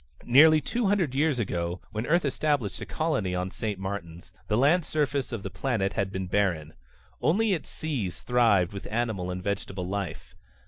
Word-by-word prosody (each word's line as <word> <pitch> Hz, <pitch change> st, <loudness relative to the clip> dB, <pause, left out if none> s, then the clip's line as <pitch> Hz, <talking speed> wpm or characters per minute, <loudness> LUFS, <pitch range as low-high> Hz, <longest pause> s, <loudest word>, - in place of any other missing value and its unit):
Nearly 155 Hz, +5 st, +7 dB
two 235 Hz, +4 st, -1 dB
hundred 190 Hz, -9 st, +1 dB
years 145 Hz, 0 st, +2 dB
ago, 90 Hz, -5 st, -2 dB
when 110 Hz, +2 st, -3 dB
Earth 170 Hz, +1 st, +3 dB
established 140 Hz, -6 st, 0 dB
a -, -, -6 dB
colony 135 Hz, -, -1 dB
on 90 Hz, +1 st, -2 dB
St. 105 Hz, -2 st, -3 dB
Martin's, 90 Hz, -3 st, -6 dB
the 105 Hz, -, +1 dB
land 155 Hz, +8 st, +4 dB
surface 145 Hz, -3 st, -1 dB
of 115 Hz, -5 st, -4 dB
the 95 Hz, -, -5 dB
planet 100 Hz, 0 st, -1 dB
had 100 Hz, -1 st, -1 dB
been 95 Hz, -1 st, -3 dB
barren. 90 Hz, -5 st, 0 dB, 0.5 s
Only 205 Hz, +6 st, +3 dB
its 165 Hz, -, -4 dB
seas 125 Hz, -, -3 dB
thrived 110 Hz, -7 st, +3 dB
with 100 Hz, +1 st, -7 dB
animal 110 Hz, -6 st, -1 dB
and 90 Hz, 0 st, -4 dB
vegetable 95 Hz, -2 st, -3 dB
life. 95 Hz, -4 st, -5 dB
105 Hz, 175 wpm, -27 LUFS, 95-145 Hz, 0.5 s, Nearly